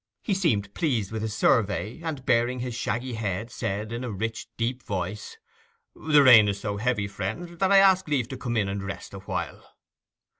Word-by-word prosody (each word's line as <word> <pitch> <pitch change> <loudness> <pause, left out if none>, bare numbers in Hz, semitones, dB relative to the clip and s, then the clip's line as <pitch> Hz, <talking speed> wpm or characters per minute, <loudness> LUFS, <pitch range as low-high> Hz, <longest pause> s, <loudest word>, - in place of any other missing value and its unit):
He 205 - 0
seemed 110 - 0
pleased 120 - -1
with 110 -1 -3
his 110 -1 -3
survey, 110 - +1
and, 155 -5 -5
baring 125 +1 +2
his 125 -1 -4
shaggy 120 +3 -3
head, 110 +1 -3
said, 105 -2 -3
in 120 +2 -4
a 125 - -3
rich 110 +2 -4
deep 125 +2 -2
voice, 100 - -5 0.6
'The 150 -2 +4
rain 115 -5 +8
is 100 0 -1
so 100 0 -3
heavy, 105 -2 0
friends, 135 - -5
that 190 0 +2
I 200 - +7
ask 190 -2 +5
leave 135 -6 0
to 130 - -6
come 120 -2 -3
in 105 -2 +1
and 100 +1 -3
rest 95 0 -7
awhile. 95 0 -6
115 Hz, 190 wpm, -26 LUFS, 105-130 Hz, 0.6 s, rain